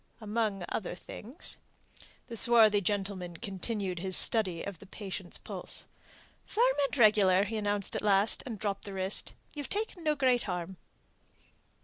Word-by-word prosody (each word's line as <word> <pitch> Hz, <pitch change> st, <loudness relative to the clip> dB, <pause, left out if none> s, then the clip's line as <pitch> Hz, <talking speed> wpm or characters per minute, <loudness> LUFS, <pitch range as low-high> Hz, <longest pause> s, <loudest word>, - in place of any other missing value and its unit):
"Among 215 Hz, -3 st, -1 dB
other 190 Hz, -4 st, -3 dB
things." 235 Hz, -, -7 dB, 0.7 s
The 235 Hz, -, -8 dB
swarthy 220 Hz, -3 st, +6 dB
gentleman 190 Hz, -3 st, -2 dB
continued 195 Hz, -2 st, -3 dB
his 185 Hz, +1 st, +2 dB
study 190 Hz, -7 st, +3 dB
of 200 Hz, -4 st, -6 dB
the -, -, -13 dB
patient's 190 Hz, -3 st, -6 dB
pulse. -, -, -4 dB, 0.6 s
"Firm -, -, +2 dB
and 290 Hz, -, -6 dB
regular," 205 Hz, -5 st, +6 dB
he 215 Hz, +3 st, -4 dB
announced 205 Hz, -1 st, -1 dB
at -, -, 0 dB
last, 205 Hz, 0 st, +2 dB
and 230 Hz, -4 st, -5 dB
dropped 200 Hz, -1 st, -3 dB
the 200 Hz, -, -6 dB
wrist. 190 Hz, +1 st, -1 dB, 0.2 s
"You've 290 Hz, -2 st, -6 dB
taken 410 Hz, -4 st, -3 dB
no 305 Hz, -1 st, +2 dB
great 255 Hz, -4 st, +3 dB
harm." 180 Hz, +1 st, -4 dB
205 Hz, 145 wpm, -31 LUFS, 190-230 Hz, 0.7 s, swarthy